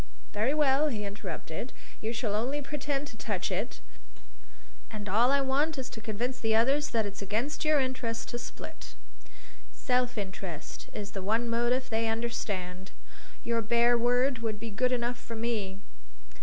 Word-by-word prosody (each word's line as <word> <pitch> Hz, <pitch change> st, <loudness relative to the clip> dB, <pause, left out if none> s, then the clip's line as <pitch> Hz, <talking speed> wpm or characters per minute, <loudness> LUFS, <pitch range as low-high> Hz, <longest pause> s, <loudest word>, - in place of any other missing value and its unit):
"Very 225 Hz, +8 st, +2 dB
well!" 295 Hz, 0 st, +4 dB
he 215 Hz, -7 st, -2 dB
interrupted. 200 Hz, +1 st, -5 dB, 0.3 s
"You 220 Hz, -, -1 dB
shall 225 Hz, -3 st, -1 dB
only 250 Hz, +7 st, +1 dB
pretend 285 Hz, 0 st, -2 dB
to -, -, -10 dB
touch -, -, -1 dB
it. -, -, -2 dB, 1.1 s
All 215 Hz, +3 st, +3 dB
I 280 Hz, 0 st, +4 dB
want 285 Hz, +3 st, +2 dB
is 260 Hz, -1 st, -4 dB
to 225 Hz, -, -7 dB
convince 235 Hz, +4 st, -2 dB
the 225 Hz, -1 st, +2 dB
others 275 Hz, +6 st, +4 dB
that 225 Hz, -2 st, +2 dB
it's 200 Hz, 0 st, -5 dB
against 220 Hz, -, -1 dB
your 305 Hz, -1 st, +5 dB
interest 255 Hz, -3 st, -1 dB
to 240 Hz, -, -3 dB
split. -, -, -8 dB, 0.8 s
Self 250 Hz, -1 st, +1 dB
interest 190 Hz, -5 st, -5 dB
is 205 Hz, -1 st, -5 dB
the 195 Hz, -, -4 dB
one 225 Hz, +5 st, +1 dB
motive 240 Hz, +2 st, +1 dB
they 225 Hz, +1 st, +2 dB
understand. 200 Hz, -5 st, -2 dB, 0.5 s
Your 235 Hz, -1 st, +1 dB
bare 235 Hz, +2 st, +4 dB
word 245 Hz, +2 st, +3 dB
would 220 Hz, -2 st, -2 dB
be 230 Hz, 0 st, -5 dB
good 250 Hz, +5 st, +2 dB
enough 240 Hz, 0 st, 0 dB
for 230 Hz, -, -7 dB
me." 215 Hz, -4 st, -1 dB
235 Hz, 155 wpm, -30 LUFS, 210-255 Hz, 1.1 s, your